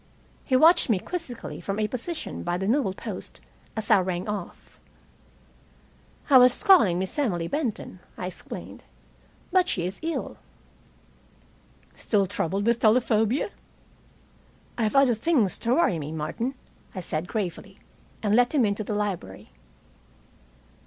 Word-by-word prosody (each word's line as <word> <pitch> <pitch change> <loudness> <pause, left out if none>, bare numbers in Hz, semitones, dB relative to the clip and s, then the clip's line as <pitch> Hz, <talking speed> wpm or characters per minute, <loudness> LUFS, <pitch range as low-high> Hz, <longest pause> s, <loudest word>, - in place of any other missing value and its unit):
He 260 - +1
watched 320 +2 +5
me 220 - +3
quizzically 270 - -6
from 200 0 -3
a 215 -1 +1
position 305 +8 -5
by 175 0 -2
the 190 - -3
newelpost, 220 -4 -2 0.4
as 215 -1 -1
I - - +7
rang 180 0 -2
off. 205 -4 -7 1.5
"I 270 -3 +8
was 250 0 +4
calling 350 - +6
Miss 190 +9 -2
Emily 175 -12 0
Benton," 250 - -3 0.2
I - - -4
explained, 185 - -8 0.7
"but 370 0 +3
she 175 - -1
is 185 +2 -5
ill." 325 0 -4 1.6
"Still 205 -3 +1
troubled 195 +1 -2
with 235 0 +2
telephobia?" 225 - +2 1.2
"I - - -3
have 215 - -1
other 275 -3 +5
things 230 - +1
to 235 +2 +1
worry 270 - +2
me, 150 0 -5
Martin," 195 - -3 0.4
I - - -3
said 160 0 -3
gravely, 195 -1 -4 0.5
and 205 -1 +1
let 245 +5 +3
him 260 -6 +4
into 205 +1 -1
the 210 - -3
library. 185 - -4
215 Hz, 135 wpm, -26 LUFS, 185-255 Hz, 1.6 s, I